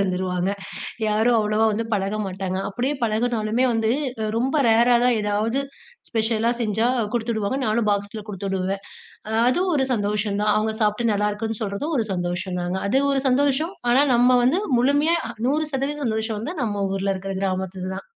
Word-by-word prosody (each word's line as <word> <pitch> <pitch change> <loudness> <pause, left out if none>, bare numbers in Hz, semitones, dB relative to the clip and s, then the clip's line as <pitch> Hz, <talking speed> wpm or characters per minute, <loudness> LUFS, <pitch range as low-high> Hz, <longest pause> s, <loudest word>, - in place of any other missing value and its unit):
இருந்துருவாங்க. 185 -1 0 0.6
யாரும் 220 +3 +3
அவ்வளோவா 215 +1 +2
வந்து 225 +2 -1
பழக 200 +2 -1
மாட்டாங்க, 190 0 -3
அப்டியே 255 +7 -1
பழகுனாலுமே 225 +1 0
வந்து, 225 -1 +1 0.5
ரொம்ப 270 +5 +1
ரேரா 235 +2 +5
தான் 250 -1 +3
ஏதாவது 215 +5 0 0.5
ஸ்பெஷலா 225 0 +1
செஞ்சா 220 +1 +1 0.3
கொடுத்துவிடுவாங்க. 225 +1 -1
நானும் 215 0 +1
பாக்ஸில 205 +1 -2
கொடுத்துவிடுவேன், 195 -1 -3 0.7
அதுவும் 355 +7 +1
ஒரு 265 -2 +1
சந்தோஷம் 205 -1 -1
தான். 210 0 +3
அவங்க 220 +1 0
சாப்பிட்டு 215 +2 +1
நல்லாயிருக்குன்னு 210 +2 -1
சொல்றதும் 215 +11 -2
ஒரு 220 - 0
சந்தோஷம் 180 +1 -3
தாங்க. 180 +2 -2
அது 260 +6 +3
ஒரு 270 -1 0
சந்தோஷம் 285 +7 +1 0.2
ஆனா, 265 +3 +5
நம்ம 245 +1 +5
வந்து 320 +10 +3 0.2
முழுமையா 290 +6 +3 0.3
100% 295 -1 -1
சந்தோஷம் 220 0 -1
வந்து 295 +11 -4
நம்ம 205 -3 -1
ஊரில 195 0 0
இருக்கிற 195 +1 -5
கிராமத்தில 185 -1 -2
தான். - - -8
220 Hz, 150 wpm, -23 LUFS, 200-245 Hz, 0.7 s, ரேரா